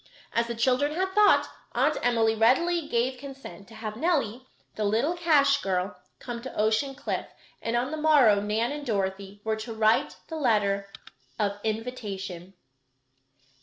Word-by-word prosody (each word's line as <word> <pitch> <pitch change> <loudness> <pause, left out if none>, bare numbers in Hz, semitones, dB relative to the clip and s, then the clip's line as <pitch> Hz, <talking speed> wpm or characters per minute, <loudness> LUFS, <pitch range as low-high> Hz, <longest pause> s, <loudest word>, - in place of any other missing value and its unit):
As 235 0 +1
the 235 - -4
children 260 +5 +1
had 380 +2 0
thought, 420 0 +5 0.3
Aunt - - +2
Emily 230 -2 +2
readily 295 +9 +2
gave 250 0 0
consent 270 -7 -10
to 225 - -14
have 215 -1 -5
Nellie, 260 -5 -1 0.3
the 215 - -3
little 225 +11 +1
cash 285 -5 +3
girl, 185 0 -1 0.2
come 240 -1 -6
to 260 - -7
Ocean 220 +6 +1
Cliff, - - -3 0.3
and 230 +1 -2
on 250 +3 0
the 310 - -3
morrow 285 -10 +5
Nan 220 +4 0
and 295 0 -5
Dorothy 200 -3 -3
were 220 0 -1
to 220 +1 -6
write 220 0 +2
the 320 - -5
letter 200 -7 +1 0.5
of 205 -1 -1
invitation. 200 -5 -5
230 Hz, 155 wpm, -27 LUFS, 210-280 Hz, 0.5 s, thought